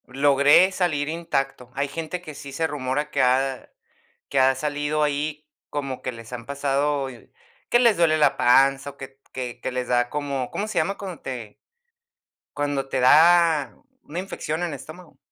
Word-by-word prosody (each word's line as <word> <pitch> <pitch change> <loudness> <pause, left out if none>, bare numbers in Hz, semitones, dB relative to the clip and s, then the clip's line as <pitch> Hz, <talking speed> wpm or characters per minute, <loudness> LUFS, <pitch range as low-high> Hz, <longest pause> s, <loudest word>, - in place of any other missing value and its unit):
Logré 140 +6 +5
salir 160 -6 -1
intacto. 135 -6 -3
Hay 140 +1 0
gente 165 +4 -5
que 155 -4 -9
sí 140 -1 -9
se 160 +4 -1
rumora 145 0 -2
que 140 - +1
ha 130 +1 +1 0.6
que 140 - 0
ha 130 0 +5
salido 145 +2 -1
ahí, 150 +1 -2 0.2
como 135 -3 -4
que - - -2
les 115 0 -12
han 120 -1 -7
pasado 140 0 0 0.6
que 240 - +4
les 235 -4 +4
duele 165 -2 +4
la 145 -2 +3
panza, 135 +3 +4
o, 140 - -17
que 135 0 -11
que 125 -2 -6
que 130 - -4
les 125 -1 -3
da 120 0 +1
como, 140 -4 -3
¿cómo 210 - -3
se - - -1
llama 195 +1 0
cuando 190 -4 -7
te 120 -5 -6 1.0
cuando 145 -2 -1
te - - -1
da 160 +1 +5 0.3
una 165 +4 -6
infección 175 -4 -4
en 175 - -1
el - - -5
estómago? 155 +5 -12
145 Hz, 175 wpm, -24 LUFS, 135-155 Hz, 1.0 s, Logré